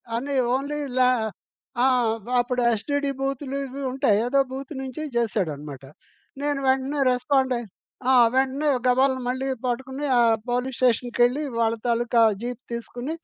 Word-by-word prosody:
అన్ని 275 Hz, +4 st, -2 dB, 0.2 s
ఓన్లీ 285 Hz, +3 st, -3 dB, 0.2 s
ల్యా 255 Hz, -1 st, +5 dB, 0.7 s
ఆ! -, -, +5 dB, 0.5 s
అప్పుడు 245 Hz, +1 st, 0 dB
ఎస్టీడీ 285 Hz, +6 st, -1 dB
బూతులు 275 Hz, 0 st, -2 dB
ఇవి 270 Hz, +2 st, -7 dB
ఉంటాయి. 260 Hz, -6 st, +2 dB
ఏదో 275 Hz, +3 st, +2 dB
బూత్ 270 Hz, +3 st, -6 dB
నుంచి 265 Hz, +2 st, -6 dB
జేశాడన్నమాట. 155 Hz, -, -2 dB, 0.6 s
నేను 290 Hz, -1 st, 0 dB
వెంటనే 265 Hz, +2 st, +1 dB
రెస్పాండ్ 260 Hz, +1 st, +1 dB
అయ్యి, 235 Hz, -1 st, -6 dB, 0.4 s
ఆ! -, -, +5 dB, 0.2 s
వెంటనే 270 Hz, +3 st, +1 dB, 0.2 s
గబాల్న 260 Hz, +1 st, +3 dB
మళ్ళీ 260 Hz, +2 st, -2 dB, 0.2 s
పట్టుకుని, 265 Hz, +3 st, -3 dB
ఆ -, -, +6 dB, 0.3 s
పోలీస్ 250 Hz, +1 st, -1 dB
స్టేషన్‌కెళ్ళి 245 Hz, +2 st, +2 dB, 0.2 s
వాళ్ళ 225 Hz, 0 st, +2 dB
తాలూకా 235 Hz, 0 st, +2 dB, 0.2 s
జీప్ 245 Hz, 0 st, -5 dB
తీసుకొని 245 Hz, +5 st, -5 dB
260 Hz, 130 wpm, -24 LUFS, 240-275 Hz, 0.7 s, ఆ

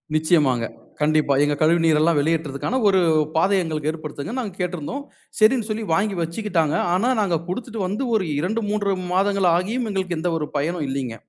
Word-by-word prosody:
நிச்சயமாங்க. 150 Hz, -7 st, +2 dB, 0.3 s
கண்டிப்பா. 150 Hz, -1 st, +2 dB
எங்க 145 Hz, 0 st, +1 dB
கழிவுநீரெல்லாம் 165 Hz, -1 st, +3 dB
வெளியேற்றுதற்கான, 155 Hz, -, -1 dB
ஒரு 190 Hz, -1 st, +4 dB, 0.4 s
பாதைய 190 Hz, +3 st, +3 dB
எங்களுக்கு 155 Hz, -2 st, -2 dB
ஏற்படுத்துங்கன் 155 Hz, -, -6 dB
நாங்க 205 Hz, -6 st, -6 dB
கேட்டிருந்தோம். 180 Hz, -, -3 dB, 0.4 s
சரின்னு 220 Hz, +1 st, +4 dB
சொல்லி 215 Hz, +1 st, -2 dB
வாங்கி 195 Hz, +2 st, +1 dB
வச்சுக்கிட்டாங்க. 165 Hz, -3 st, -1 dB, 0.2 s
ஆனா, 225 Hz, +8 st, +2 dB
நாங்க 175 Hz, -5 st, +1 dB
குடுத்துட்டு 230 Hz, +1 st, -4 dB
வந்து 210 Hz, +8 st, -2 dB
ஒரு 195 Hz, -4 st, +1 dB
2, 215 Hz, +8 st, -1 dB
3 205 Hz, -2 st, 0 dB, 0.2 s
மாதங்கள் 195 Hz, -1 st, +2 dB
ஆகியும் 225 Hz, +6 st, -2 dB
எங்களுக்கு 185 Hz, -3 st, -2 dB
எந்த 175 Hz, +1 st, -1 dB
ஒரு 150 Hz, -, -3 dB
பயனும் 155 Hz, +1 st, -1 dB
இல்லீங்க. 130 Hz, -4 st, -3 dB
175 Hz, 155 wpm, -22 LUFS, 155-205 Hz, 0.4 s, ஒரு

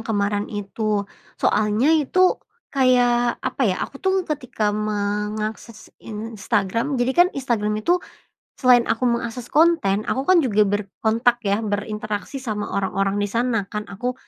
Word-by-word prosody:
kemaren 205 Hz, -1 st, -1 dB
itu 205 Hz, 0 st, -2 dB, 0.3 s
soalnya 215 Hz, +8 st, +2 dB
itu 325 Hz, +4 st, +3 dB, 0.3 s
kayak, 245 Hz, -2 st, +3 dB
apa 270 Hz, -, -2 dB
ya, 185 Hz, -, 0 dB
aku 275 Hz, -, -12 dB
tuh 380 Hz, -1 st, +1 dB
ketika 250 Hz, -9 st, -2 dB
mengakses 210 Hz, +1 st, -3 dB
Instagram 225 Hz, +3 st, -2 dB
jadi 245 Hz, +1 st, +1 dB
kan 350 Hz, +4 st, +5 dB
Instagram 225 Hz, -6 st, -1 dB
itu 355 Hz, +1 st, +3 dB, 0.5 s
selain 250 Hz, -2 st, +4 dB
aku 245 Hz, +2 st, 0 dB
mengakses 235 Hz, 0 st, -3 dB
konten, 300 Hz, -11 st, +3 dB
aku 265 Hz, -, 0 dB
kan 365 Hz, +5 st, +4 dB
juga 215 Hz, -9 st, +3 dB
berkontak 220 Hz, +4 st, 0 dB
ya, 200 Hz, 0 st, +1 dB
berinteraksi 210 Hz, +3 st, -3 dB
sama 215 Hz, -5 st, -4 dB
orang-orang 195 Hz, +1 st, -1 dB
di 205 Hz, -, +1 dB
sana 230 Hz, -1 st, 0 dB
kan. 210 Hz, +1 st, -4 dB
Aku 245 Hz, +6 st, -3 dB
225 Hz, 135 wpm, -22 LUFS, 205-255 Hz, 0.5 s, kan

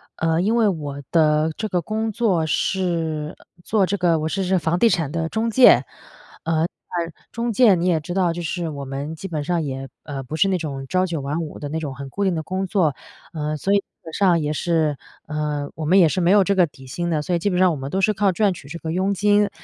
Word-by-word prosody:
呃， 165 Hz, +1 st, +1 dB
因 220 Hz, +5 st, +1 dB
为 225 Hz, -3 st, +4 dB
我 145 Hz, -6 st, -3 dB
的 155 Hz, -1 st, +3 dB
这 215 Hz, -, -3 dB
个 180 Hz, -1 st, 0 dB
工 220 Hz, +5 st, -2 dB
作 200 Hz, -8 st, +1 dB
是 165 Hz, -3 st, -1 dB, 0.3 s
做 210 Hz, -3 st, +2 dB
这 200 Hz, -, -1 dB
个 170 Hz, -2 st, +2 dB
我 155 Hz, -, -1 dB
是 195 Hz, +3 st, -1 dB
是 185 Hz, +1 st, +2 dB
房 165 Hz, +2 st, 0 dB
地 230 Hz, -, +5 dB
产 160 Hz, -7 st, 0 dB
的 165 Hz, 0 st, -2 dB
中 225 Hz, +1 st, -1 dB
介。 255 Hz, +2 st, +7 dB, 0.6 s
呃， 165 Hz, 0 st, +1 dB, 0.7 s
中 235 Hz, 0 st, -2 dB
介 220 Hz, -4 st, +6 dB
你 175 Hz, 0 st, -1 dB
也 165 Hz, -3 st, +3 dB
知 175 Hz, +4 st, -6 dB
道 180 Hz, -3 st, +2 dB
就 175 Hz, -, -5 dB
是 170 Hz, 0 st, -3 dB
我 140 Hz, -2 st, -6 dB
们 140 Hz, +4 st, -5 dB
基 195 Hz, -, -7 dB
本 155 Hz, -5 st, -3 dB
上 170 Hz, +2 st, 0 dB
也， 135 Hz, -1 st, -5 dB, 0.2 s
呃， 140 Hz, -3 st, -6 dB
不 150 Hz, +5 st, -6 dB
是 195 Hz, +4 st, +3 dB
那 185 Hz, -, +1 dB
种 140 Hz, -5 st, -5 dB
朝 185 Hz, +5 st, +1 dB
九 165 Hz, -5 st, -3 dB
晚 145 Hz, +4 st, -2 dB
五 155 Hz, -2 st, -6 dB
的 145 Hz, -, -5 dB
那 160 Hz, +2 st, -2 dB
种 145 Hz, -4 st, -5 dB
很 140 Hz, 0 st, -7 dB
固 200 Hz, +9 st, -3 dB
定 190 Hz, -, +2 dB
的 160 Hz, -, -3 dB
工 190 Hz, +3 st, -2 dB
作， 170 Hz, -8 st, +1 dB, 0.4 s
呃， 150 Hz, -1 st, -2 dB
所 195 Hz, +6 st, 0 dB
以 -, -, +6 dB
基 200 Hz, -, -2 dB, 0.2 s
本 160 Hz, -1 st, -10 dB
上 180 Hz, -4 st, +3 dB
也 150 Hz, 0 st, -1 dB
是， 155 Hz, -3 st, 0 dB, 0.3 s
呃， 150 Hz, -2 st, -2 dB
我 155 Hz, -, -4 dB
们 185 Hz, +5 st, +4 dB
也 170 Hz, -, +7 dB
是 185 Hz, -, -1 dB
没 170 Hz, -, +3 dB
有 205 Hz, -1 st, +6 dB
这 200 Hz, -, +1 dB
个 180 Hz, -3 st, +4 dB
底 135 Hz, -2 st, -16 dB
薪 175 Hz, +7 st, -3 dB
的， 155 Hz, -3 st, 0 dB
所 180 Hz, -, -2 dB
以 -, -, 0 dB
基 205 Hz, -, 0 dB
本 180 Hz, -, -1 dB
上 185 Hz, 0 st, +4 dB
我 -, -, -2 dB
们 135 Hz, 0 st, -5 dB
都 190 Hz, -, -1 dB
是 215 Hz, +2 st, +3 dB
靠 200 Hz, -1 st, +2 dB
赚 200 Hz, +1 st, +2 dB
取 150 Hz, -, -12 dB
这 150 Hz, -, -7 dB
个 160 Hz, -1 st, -5 dB
佣 190 Hz, +3 st, 0 dB
金， 205 Hz, +1 st, +3 dB
170 Hz, 280 characters per minute, -22 LUFS, 150-190 Hz, 0.7 s, 介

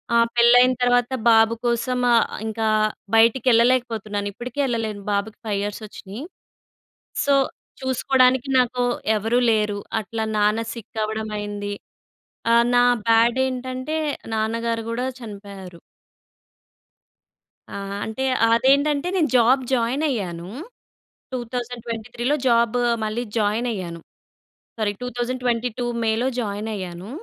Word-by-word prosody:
ఆ -, -, +6 dB, 0.2 s
పెళ్ళయిన 245 Hz, +2 st, +6 dB
తర్వాత 245 Hz, 0 st, +3 dB, 0.2 s
బాబు 225 Hz, 0 st, +5 dB
కోసం 240 Hz, +1 st, 0 dB, 0.2 s
ఆహ్, 230 Hz, -, +4 dB, 0.2 s
ఇంకా 220 Hz, 0 st, -1 dB, 0.5 s
బయటికి 230 Hz, +3 st, +4 dB
యెళ్ళలేకపోతున్నాను. 225 Hz, -4 st, +1 dB
ఇప్పటికీ 245 Hz, +5 st, -7 dB
యెళ్ళలేను, 225 Hz, -5 st, -2 dB
బాబుకి 200 Hz, +2 st, -2 dB
5 210 Hz, -, 0 dB
ఇయర్స్ 205 Hz, +1 st, -4 dB
ఒచ్చినాయి. 205 Hz, +4 st, -9 dB, 1.0 s
సో 285 Hz, -, +3 dB, 0.5 s
చూసుకోడానికి 260 Hz, 0 st, +2 dB
నాకు 250 Hz, 0 st, +1 dB, 0.4 s
ఎవరూ 225 Hz, +4 st, +1 dB
లేరు. 210 Hz, -2 st, 0 dB, 0.2 s
అట్లా 220 Hz, +2 st, -4 dB
నాన్న 210 Hz, +2 st, +2 dB
సిక్ 230 Hz, -1 st, -8 dB
అవ్వడం 220 Hz, 0 st, -3 dB
అయింది. 205 Hz, 0 st, -4 dB, 0.8 s
ఆహ్, 235 Hz, 0 st, +5 dB
నా 245 Hz, -, +6 dB, 0.2 s
బ్యాడ్ 230 Hz, +2 st, +4 dB
ఏంటంటే 255 Hz, +3 st, -4 dB, 0.4 s
నాన్నగారు 230 Hz, +1 st, -1 dB
గూడా 245 Hz, +2 st, -2 dB
చనిపోయారు. 200 Hz, -5 st, -10 dB, 1.9 s
ఆ! -, -, -8 dB, 0.3 s
అంటే 220 Hz, +4 st, -4 dB, 0.3 s
అదేంటంటే 280 Hz, +5 st, +3 dB
నేను 325 Hz, -5 st, +2 dB
జాబ్ 250 Hz, +3 st, +4 dB
జాయిన్ 250 Hz, +4 st, +1 dB
అయ్యాను. 180 Hz, -8 st, -4 dB, 0.8 s
2023లో 240 Hz, +1 st, -3 dB
జాబు 235 Hz, 0 st, +3 dB, 0.3 s
మళ్ళీ 215 Hz, +3 st, -2 dB
జాయిన్ 215 Hz, +3 st, +1 dB
అయ్యాను. 170 Hz, -4 st, -6 dB, 0.8 s
సారీ 210 Hz, -2 st, 0 dB
2022 245 Hz, -1 st, -2 dB, 0.2 s
మే‌లో 225 Hz, +3 st, +1 dB
జాయినైయ్యాను. 200 Hz, -3 st, -5 dB
230 Hz, 105 wpm, -22 LUFS, 215-250 Hz, 1.9 s, ఆ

